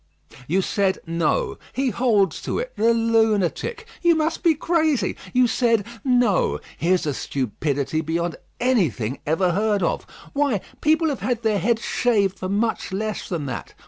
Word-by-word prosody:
"You 185 +5 +1
said, 195 -1 +1
No. 165 -2 0
He 265 -1 0
holds 205 - +2
to - - -2
it, - - -4
the 230 +2 +3
lunatic! 225 - +1 0.2
You 345 -1 +4
must 315 +1 0
be 335 -3 +4
crazy. 315 -3 +1 0.2
You 250 0 +4
said, 230 -3 +2 0.2
No. 245 -6 +2 0.2
Here's 180 +1 +1
a 145 - 0
stupidity 140 +4 -2
beyond 165 +1 -2 0.2
anything 155 - +1
ever 175 +4 +2
heard 205 +1 +1
of. - - -1 0.3
Why, 280 -9 +1 0.2
people 315 +1 +3
have 280 - -3
had 240 -2 -2
their 215 -2 +2
heads 225 +4 +1
shaved 205 -6 +1
for 185 - -3
much 215 +2 -1
less 210 +2 -3
than 165 -5 -2
that. 135 - -6
215 Hz, 155 wpm, -23 LUFS, 175-250 Hz, 0.3 s, You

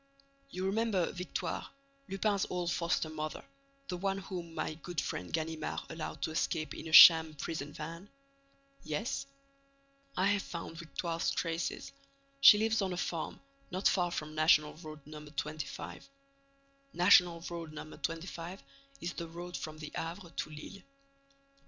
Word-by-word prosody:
"You 185 -4 -4
remember 200 -3 +1
Victoire, 180 +1 -4 0.4
Lupin's 195 0 +1
old 175 -1 -1
foster 170 -1 0
mother, 155 0 -5 0.4
the 180 - -3
one 195 +1 0
whom 180 -4 -6
my - - -2
good 165 +1 -5
friend 90 - -3
Ganimard 160 -1 -2
allowed 160 -1 -5
to - - -1
escape 155 0 -1
in - - -7
a - - -6
sham 160 -1 +10
prison 150 0 -4
van?" 165 +6 -7 0.7
"Yes." 155 - -2 0.9
"I 185 - +3
have 205 0 +3
found 165 -2 -7
Victoire's 170 0 -2
traces. 165 0 -2 0.5
She 210 - +10
lives 220 +1 +2
on 190 -2 0
a - - -4
farm, 165 -2 -3 0.3
not 185 +2 +1
far 175 -2 +2
from 155 -3 -4
National 155 -1 +4
Road 155 -2 -10
No. 150 0 -9
25. 150 - -5 0.8
National 175 -2 +6
Road 170 -2 -6
No. 155 0 -8
25 170 +2 -5 0.4
is 175 +1 -3
the 170 - -5
road 175 +2 -7
from 155 0 -5
the 155 -1 -7
Havre 170 +2 -5
to - - -4
Lille. 155 +6 -9
170 Hz, 145 wpm, -33 LUFS, 155-180 Hz, 0.9 s, sham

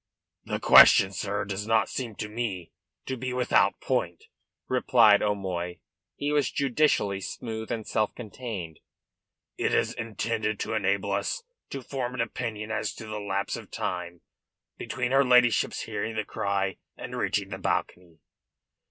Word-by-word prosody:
"The - - -2
question, 95 - +8
sir, 100 +1 -2
does 100 +1 -4
not 115 0 +3
seem 120 -5 -5
to 105 - -4
me 105 -6 -4 0.3
to 130 - -3
be 130 0 -4
without 125 -1 +2
point," - - -1 0.4
replied 120 -4 +5
O'Moy. 95 -4 -2 0.4
He 145 +1 -2
was 145 -2 +2
judicially 125 -8 +1
smooth 110 +3 -5
and 115 -2 -3
self 110 -1 0
contained. 105 -8 -7 0.8
"It - - +1
is - - +1
intended 110 -1 -2
to - - -2
enable 100 -1 0
us 100 - -1 0.3
to 135 -2 -6
form 125 -1 -4
an 125 - -1
opinion 110 -2 -4
as 110 -1 -2
to 110 - -9
the 110 -1 -5
lapse 100 -1 -2
of - - -9
time 90 -1 -4 0.5
between 125 -1 -3
her 135 +1 +5
ladyship's 125 -3 +4
hearing 110 +2 -4
the 110 -1 -1
cry 100 -1 -1 0.2
and - - -7
reaching - - -1
the - - -6
balcony." 85 -2 -2
110 Hz, 150 wpm, -27 LUFS, 100-120 Hz, 0.8 s, question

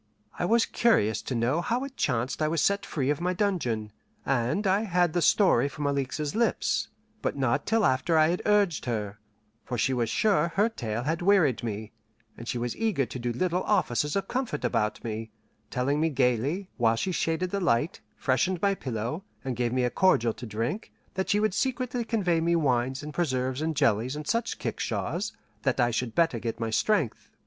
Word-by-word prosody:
I - - +1
was 230 +4 +4
curious 110 - +2
to 130 - -4
know 125 +8 +1
how 240 +8 -1
it 275 -1 -7
chanced 125 - -1
I 155 - +3
was 165 +1 0
set 200 +5 +1
free 140 -2 0
of 150 - -2
my 180 +1 +1
dungeon, 125 - -1 0.3
and 135 - 0
I 195 +2 +3
had 180 -5 +1
the 175 - +1
story 150 - +4
from 145 +1 -5
Alixe's 140 +1 -1
lips; 235 +1 +1 0.3
but - - -2
not - - 0
till 225 -2 +3
after 150 +5 +2
I 155 0 +5
had 175 - -1
urged 205 -6 +2
her, 105 -4 -3 0.4
for 125 - -4
she 130 +4 +1
was 120 -3 0
sure 170 - +2
her 210 +3 +3
tale 115 - -4
had 160 +5 -1
wearied 175 - +3
me, 110 -2 -4 0.4
and 120 - -10
she 120 - -2
was 120 0 -2
eager 215 - 0
to 125 - -7
do 120 0 -1
little 180 +8 0
offices 150 - +1
of 195 -1 -1
comfort 245 - -2
about 105 -3 0
me; 110 0 -4 0.4
telling 140 +4 0
me 165 - +3
gaily, 135 - 0
while 115 -2 +3
she 185 +11 -1
shaded 175 +1 -1
the 200 - -1
light, 145 +3 +1
freshened 150 +8 +1
my 200 +2 +2
pillow, 125 - -4 0.2
and 130 -2 -2
gave 120 -1 0
me 130 0 +1
a 125 - +1
cordial 120 -12 +3
to 120 +2 -8
drink, 115 - -3 0.2
that 190 0 -2
she 205 - +3
would 215 -2 +1
secretly 250 0 -1
convey 185 -8 +1
me 170 +1 +2
wines 130 -3 +1
and 150 0 -7
preserves 130 -4 -1
and 160 0 -1
jellies 115 +3 +2
and 150 0 -6
such 230 +5 -1
kickshaws, - - -3 0.3
that - - 0
I 120 0 +3
should 115 0 -2
better 160 -8 +2
get 115 0 -4
my 115 -1 -2
strength. 165 - 0
150 Hz, 200 wpm, -27 LUFS, 120-190 Hz, 0.4 s, I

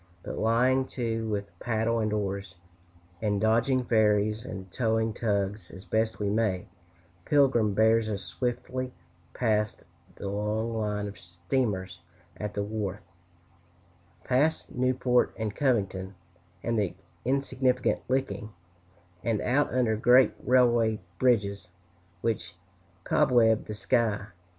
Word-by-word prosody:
But - - -5
lying 125 +4 +3
to 115 -2 -1
with 100 -4 -4
paddle 115 0 0
and 110 -1 0
oars, 100 -2 -3 0.7
and 105 -2 +1
dodging 115 +4 +2
ferries 110 -1 +2
and 95 -2 -8
towing 110 -1 0
tugs 100 -4 -1
as 95 +3 -11
best 110 +4 0
we 105 - -2
may, 100 -3 0 0.6
Pilgrim 125 -7 +3
bears 110 +1 +4
us 100 -2 -3
swiftly 125 +1 -3 0.4
past 105 -3 0 0.3
the 100 - -6
long 105 +3 -1
line 105 -1 -1
of 100 -2 -9
steamers 90 +1 -2 0.4
at 105 +2 -5
the 100 - 0
wharf, 105 -1 -3 1.2
past 145 +5 +1
Newport 125 -1 +1
and 110 -2 -3
Covington, 100 -8 0 0.5
and 115 -1 0
the 100 -4 -1 0.3
insignificant 130 -1 +1
Licking,[A] 130 -4 -1 0.7
and 115 -3 0
out 140 +4 +1
under 120 -3 +2
great 125 +4 +5
railway 120 -4 +3 0.2
bridges 100 -7 +2 0.5
which 90 -6 -2 0.5
cobweb 115 -3 +3
the 105 - -6
sky. 110 -2 0
110 Hz, 115 wpm, -28 LUFS, 100-125 Hz, 1.2 s, great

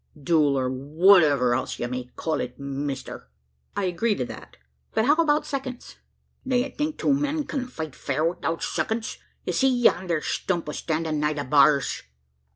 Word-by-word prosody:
"Duel, 145 -1 +3
or 130 -1 0
whatever 145 -1 +4
else 130 +1 -2
ye - - -2
may 125 0 -4
call 160 -1 -1
it, 125 - -6
mister." 140 0 -5 0.5
"I 205 - -1
agree 190 +5 +1
to - - -2
that. - - -11 0.4
But 220 - +3
how 285 - +6
about 310 -2 +2
seconds?" 260 -3 -6 0.5
"D'ye 255 0 +1
think 300 +2 -3
two 280 - +2
men 290 +2 0
can't 255 -3 -4
fight 160 - -5
fair 145 +3 -1
'ithout 165 -1 -2
seconds? 225 0 -2 0.3
Ye - - -1
see 265 - +3
yander 185 -9 +2
stump 170 -4 -2
standin' 160 -1 -2
nigh 150 +1 +1
the 145 -1 -3
bars?" 140 +1 +3
165 Hz, 165 wpm, -25 LUFS, -, 0.5 s, how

